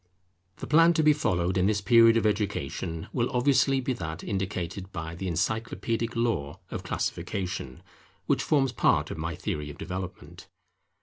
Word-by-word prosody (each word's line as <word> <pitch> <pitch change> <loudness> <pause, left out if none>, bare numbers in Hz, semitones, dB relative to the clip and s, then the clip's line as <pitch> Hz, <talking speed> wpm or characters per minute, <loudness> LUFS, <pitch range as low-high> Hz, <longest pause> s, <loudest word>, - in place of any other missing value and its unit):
The - - -7
plan 165 +2 +5
to 155 - +3
be 150 0 +6
followed 95 - 0
in 90 - +3
this 105 -1 +2
period 115 +2 +6
of 115 - +1
education, 95 -6 -2
will 120 -1 0
obviously 135 +1 +3
be 130 0 -1
that 80 -8 -6
indicated 95 -1 -3
by 80 -2 -5
the 95 +3 -5
encyclopædic 115 +6 -1
law 100 -9 -1
of - - -4
Classification, 90 -9 -4 0.4
which - - +1
forms 135 -4 +2
part 120 - +2
of - - -6
my 85 +1 -3
Theory 75 -1 -4
of 75 - -9
Development. 90 +2 -7
100 Hz, 160 wpm, -27 LUFS, 85-120 Hz, 0.4 s, be